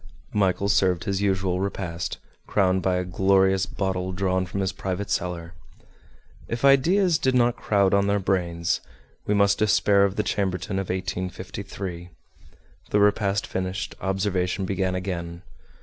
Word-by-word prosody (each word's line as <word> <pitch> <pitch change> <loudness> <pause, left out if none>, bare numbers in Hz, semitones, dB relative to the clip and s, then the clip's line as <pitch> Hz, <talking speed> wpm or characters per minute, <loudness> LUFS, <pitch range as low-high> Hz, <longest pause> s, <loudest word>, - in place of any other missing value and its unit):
Michel 100 -1 +1
served 95 -3 +2
his 100 0 -1
usual 95 -2 0
repast, 95 -3 -3 0.3
crowned 95 -2 +2
by 95 -1 +1
a 90 - 0
glorious 95 +1 +2
bottle 95 -1 -2
drawn 95 0 0
from 100 +2 -3
his 95 -1 0
private 95 +1 -4
cellar. 85 -1 -2 0.9
If 115 +3 -2
ideas 165 +6 +4
did 130 -1 +1
not 120 -1 +3
crowd 100 -4 +2
on 100 0 +3
their 100 0 +2
brains, 85 -3 0 0.5
we 105 - +2
must 100 0 +3
despair 105 -2 +4
of 100 -1 +1
the 105 - 0
Chambertin 95 -1 -1
of 95 - -4
1853. 95 0 -5 0.8
The 105 - +2
repast 100 -1 +2
finished, 95 +1 -3
observation 95 0 -1
began 95 -1 -1
again. 85 -2 -4
95 Hz, 140 wpm, -25 LUFS, 90-100 Hz, 0.9 s, ideas